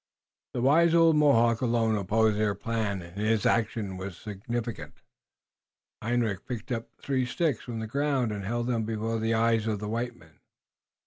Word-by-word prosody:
The 120 Hz, -, -1 dB
wise 165 Hz, +5 st, +5 dB
old 165 Hz, -1 st, +6 dB
Mohawk 120 Hz, -6 st, +4 dB
alone 115 Hz, -3 st, +2 dB
opposed 105 Hz, +2 st, +2 dB
the 105 Hz, -1 st, +1 dB
plan, 110 Hz, -5 st, -2 dB
and 85 Hz, +4 st, -10 dB
his 110 Hz, -1 st, +1 dB
action 110 Hz, -4 st, 0 dB
was 95 Hz, -1 st, -6 dB
significant. 115 Hz, +3 st, -5 dB, 1.1 s
Hendrik 115 Hz, -4 st, -1 dB
picked 120 Hz, -1 st, -5 dB
up 115 Hz, -2 st, -3 dB
three 135 Hz, -2 st, -1 dB
sticks 140 Hz, +1 st, -1 dB
from 120 Hz, -2 st, -6 dB
the 110 Hz, -, -3 dB
ground 135 Hz, -1 st, 0 dB
and 100 Hz, -1 st, -4 dB
held 120 Hz, +4 st, -2 dB
them 120 Hz, -2 st, 0 dB
before 115 Hz, +1 st, -2 dB
the 115 Hz, +1 st, +1 dB
eyes 115 Hz, -1 st, +2 dB
of 110 Hz, -2 st, 0 dB
the 105 Hz, +1 st, -5 dB
white 120 Hz, +2 st, -2 dB
men. 80 Hz, -2 st, -21 dB
115 Hz, 170 wpm, -28 LUFS, 105-120 Hz, 1.1 s, old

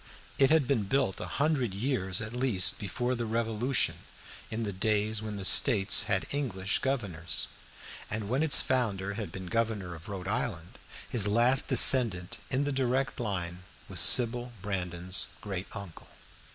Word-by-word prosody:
It 135 Hz, -1 st, +4 dB
had 155 Hz, -5 st, +2 dB
been 120 Hz, -7 st, -1 dB
built 100 Hz, -3 st, -1 dB
a -, -, -6 dB
hundred 140 Hz, -9 st, -1 dB
years 100 Hz, -5 st, -2 dB
at 110 Hz, +1 st, -7 dB
least 120 Hz, -7 st, 0 dB
before 120 Hz, +5 st, -4 dB
the 120 Hz, -2 st, -4 dB
Revolution 115 Hz, +3 st, -2 dB, 0.5 s
in 115 Hz, +1 st, -5 dB
the 100 Hz, -2 st, -5 dB
days 105 Hz, +2 st, -1 dB
when 110 Hz, -1 st, -7 dB
the 100 Hz, -2 st, -5 dB
States 100 Hz, 0 st, +4 dB
had 95 Hz, -, -1 dB
English 100 Hz, -9 st, -2 dB
governors, 100 Hz, -, -1 dB, 0.6 s
and 105 Hz, -1 st, -5 dB
when 130 Hz, +6 st, -1 dB
its 160 Hz, -2 st, +4 dB
founder 100 Hz, -7 st, -2 dB
had 105 Hz, -1 st, -7 dB
been 95 Hz, -1 st, -9 dB
governor 110 Hz, -3 st, -3 dB
of 85 Hz, +3 st, -13 dB
Rhode 95 Hz, -2 st, -7 dB
Island. 105 Hz, -3 st, -5 dB, 0.3 s
His 110 Hz, -5 st, +2 dB
last 120 Hz, +5 st, +5 dB
descendant 115 Hz, -8 st, +6 dB
in 130 Hz, +2 st, 0 dB
the 145 Hz, -, -3 dB
direct 135 Hz, 0 st, -2 dB
line 90 Hz, -6 st, -5 dB, 0.3 s
was -, -, 0 dB
Sybil 120 Hz, 0 st, +5 dB
Brandon's 90 Hz, -2 st, -4 dB
great 95 Hz, -2 st, -7 dB
uncle. 100 Hz, -5 st, -11 dB
110 Hz, 155 wpm, -28 LUFS, 95-125 Hz, 0.6 s, descendant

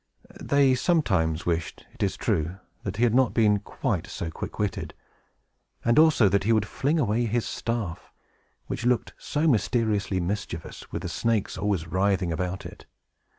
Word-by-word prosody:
They 140 Hz, -2 st, +4 dB
sometimes 95 Hz, -, +1 dB
wished, 85 Hz, -1 st, -2 dB
it -, -, -12 dB
is -, -, 0 dB
true, 85 Hz, +4 st, -1 dB, 0.2 s
that 100 Hz, 0 st, -5 dB
he 120 Hz, -, +1 dB
had 120 Hz, -2 st, +4 dB
not 130 Hz, 0 st, +3 dB
been 105 Hz, -3 st, +4 dB
quite 100 Hz, -, -2 dB
so 80 Hz, -, -5 dB
quick -, -, -7 dB
witted, 105 Hz, -2 st, -2 dB, 0.9 s
and 120 Hz, +4 st, +5 dB
also 155 Hz, -9 st, +6 dB
that 100 Hz, 0 st, +2 dB
he 110 Hz, -, +2 dB
would 110 Hz, -2 st, +3 dB
fling 145 Hz, +8 st, 0 dB
away 120 Hz, -2 st, +1 dB
his 115 Hz, +1 st, 0 dB
staff, 115 Hz, -8 st, -4 dB, 0.5 s
which 115 Hz, -, -4 dB
looked 125 Hz, 0 st, +1 dB
so 150 Hz, +2 st, 0 dB
mysteriously 105 Hz, -5 st, +1 dB
mischievous, 90 Hz, -2 st, -5 dB
with -, -, -4 dB
the -, -, -2 dB
snakes 115 Hz, -3 st, 0 dB
always 100 Hz, -5 st, -1 dB
writhing 95 Hz, +1 st, +1 dB
about 90 Hz, +3 st, -3 dB
it. -, -, -11 dB
105 Hz, 160 wpm, -26 LUFS, 95-120 Hz, 0.9 s, also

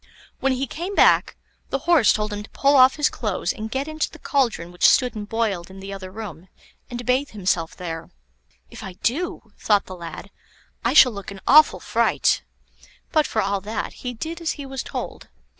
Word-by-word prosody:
When 270 Hz, 0 st, +1 dB
he 260 Hz, +2 st, -1 dB
came 350 Hz, +8 st, -5 dB
back, -, -, +4 dB, 0.3 s
the -, -, 0 dB
Horse 335 Hz, -9 st, +5 dB
told 210 Hz, 0 st, -1 dB
him 205 Hz, -, -4 dB
to 210 Hz, -, -12 dB
pull 280 Hz, +1 st, +2 dB
off 260 Hz, 0 st, +7 dB
his 295 Hz, -, +2 dB
clothes 200 Hz, -6 st, -2 dB
and 220 Hz, 0 st, -6 dB
get 265 Hz, +5 st, -2 dB
into 310 Hz, 0 st, -2 dB
the -, -, -13 dB
cauldron 230 Hz, -, -1 dB
which 175 Hz, -, +5 dB
stood 250 Hz, -1 st, +3 dB
and 205 Hz, -1 st, -6 dB
boiled 205 Hz, -7 st, -1 dB
in 190 Hz, +1 st, -11 dB
the 195 Hz, +1 st, -7 dB
other 190 Hz, -1 st, -7 dB
room, 185 Hz, -4 st, -8 dB, 0.4 s
and 245 Hz, 0 st, -6 dB
bathe 260 Hz, +3 st, +1 dB
himself 180 Hz, -5 st, -1 dB
there. 165 Hz, -2 st, -6 dB, 0.6 s
"If -, -, -10 dB
I 190 Hz, -, -7 dB
do," 260 Hz, -, -3 dB
thought 205 Hz, -2 st, +2 dB
the 185 Hz, -, -8 dB
lad, 170 Hz, +3 st, -9 dB, 0.5 s
"I -, -, +1 dB
shall 250 Hz, -, +8 dB
look 200 Hz, -3 st, -8 dB
an 200 Hz, -1 st, -9 dB
awful 305 Hz, +2 st, +6 dB
fright;" -, -, +1 dB, 0.7 s
but 310 Hz, -2 st, +3 dB
for 220 Hz, -, 0 dB
all 200 Hz, 0 st, -1 dB
that, 215 Hz, +3 st, -4 dB
he 250 Hz, -1 st, -6 dB
did 325 Hz, +8 st, -6 dB
as 330 Hz, -, -1 dB
he 285 Hz, -, -8 dB
was 270 Hz, -1 st, -5 dB
told. -, -, -6 dB
220 Hz, 200 wpm, -23 LUFS, 195-270 Hz, 0.7 s, shall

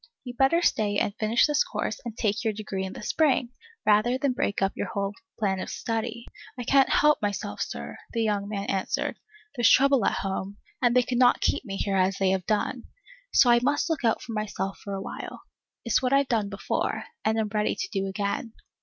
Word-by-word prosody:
You'd 245 Hz, -2 st, -8 dB
better 335 Hz, +6 st, +3 dB
stay 205 Hz, -7 st, +2 dB
and 205 Hz, -, 0 dB
finish 220 Hz, +2 st, +3 dB
this 295 Hz, -1 st, +2 dB
course -, -, -4 dB
and 235 Hz, -2 st, -7 dB
take 215 Hz, 0 st, 0 dB
your 220 Hz, -2 st, 0 dB
degree 200 Hz, -2 st, -4 dB
in 190 Hz, -, -6 dB
the -, -, -9 dB
spring, 270 Hz, -2 st, +2 dB, 0.4 s
rather 215 Hz, +4 st, +4 dB
than 265 Hz, -1 st, 0 dB
break 205 Hz, -5 st, -1 dB
up 195 Hz, 0 st, +1 dB
your -, -, -3 dB
whole 200 Hz, 0 st, -2 dB, 0.2 s
plan 195 Hz, -3 st, 0 dB
of -, -, -5 dB
study. 230 Hz, +1 st, -3 dB, 0.3 s
I 245 Hz, -, -4 dB
can't 270 Hz, +2 st, +4 dB
help 300 Hz, 0 st, +4 dB
myself, 205 Hz, -1 st, -3 dB
Sir, -, -, -5 dB
the 230 Hz, -1 st, 0 dB
young 205 Hz, -2 st, -1 dB
man 200 Hz, -2 st, -3 dB
answered. 190 Hz, -2 st, -2 dB, 0.4 s
There 240 Hz, -, -3 dB
's -, -, +8 dB
trouble 275 Hz, -3 st, +5 dB
at -, -, +1 dB
home, 195 Hz, +1 st, -3 dB, 0.2 s
and 245 Hz, -1 st, +3 dB
they 250 Hz, -, +5 dB
cannot 245 Hz, 0 st, +3 dB
keep -, -, +1 dB
me 195 Hz, -3 st, -5 dB
here 195 Hz, -1 st, 0 dB
as 185 Hz, +1 st, +2 dB
they 190 Hz, -1 st, +2 dB
have 190 Hz, -2 st, -1 dB
done. 220 Hz, +3 st, -1 dB, 0.5 s
So 245 Hz, -, +6 dB
I 240 Hz, -, +6 dB
must 290 Hz, +5 st, +1 dB
look 310 Hz, -4 st, -2 dB
out 225 Hz, -1 st, +1 dB
for -, -, -7 dB
myself 195 Hz, -2 st, -3 dB
for 200 Hz, -1 st, -4 dB
a 195 Hz, -, -4 dB
while. -, -, -7 dB, 0.4 s
It's 235 Hz, -, +2 dB
what 255 Hz, +1 st, +1 dB
I've 275 Hz, 0 st, +4 dB
done 215 Hz, -4 st, +1 dB
before, 200 Hz, 0 st, -2 dB, 0.2 s
and 220 Hz, +1 st, +1 dB
am 220 Hz, -1 st, 0 dB
ready 210 Hz, 0 st, 0 dB
to -, -, -3 dB
do 195 Hz, -1 st, -1 dB
again. 200 Hz, +3 st, -3 dB
220 Hz, 215 wpm, -26 LUFS, 200-245 Hz, 0.5 s, s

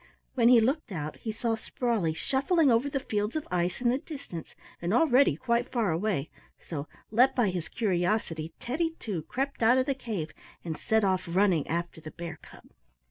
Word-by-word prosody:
When 235 Hz, -2 st, +4 dB
he 245 Hz, -2 st, +8 dB
looked 260 Hz, +2 st, 0 dB
out 155 Hz, -4 st, -4 dB
he 220 Hz, -, -4 dB
saw 225 Hz, +1 st, -1 dB
Sprawley 225 Hz, -7 st, -1 dB
shuffling 275 Hz, -, +2 dB
over 235 Hz, +5 st, +3 dB
the 275 Hz, -, -1 dB
fields 210 Hz, -3 st, -2 dB
of 310 Hz, -, -3 dB
ice 175 Hz, +4 st, 0 dB
in 245 Hz, -, +3 dB
the 255 Hz, +3 st, +1 dB
distance, 275 Hz, -, -8 dB, 0.3 s
and 175 Hz, +5 st, 0 dB
already 260 Hz, -, +5 dB
quite 235 Hz, -, 0 dB
far 225 Hz, -7 st, +1 dB
away, 165 Hz, -3 st, -1 dB, 0.3 s
so, 150 Hz, -3 st, -6 dB, 0.2 s
led 245 Hz, +4 st, +4 dB
by 230 Hz, -7 st, +2 dB
his 175 Hz, -3 st, -4 dB
curiosity, 175 Hz, -5 st, 0 dB
Teddy, 325 Hz, +6 st, -1 dB
too, 195 Hz, -8 st, -3 dB
crept 270 Hz, -, -3 dB
out 230 Hz, +3 st, +5 dB
of 260 Hz, -, +2 dB
the 275 Hz, -, +1 dB
cave 210 Hz, -12 st, -4 dB, 0.3 s
and 160 Hz, -2 st, -3 dB
set 220 Hz, +3 st, +1 dB
off 185 Hz, -2 st, +1 dB
running 180 Hz, -3 st, +2 dB
after 170 Hz, 0 st, -3 dB
the 155 Hz, -, -8 dB
bear 170 Hz, +2 st, -7 dB
cub. -, -, -15 dB
220 Hz, 190 wpm, -29 LUFS, 170-250 Hz, 0.3 s, he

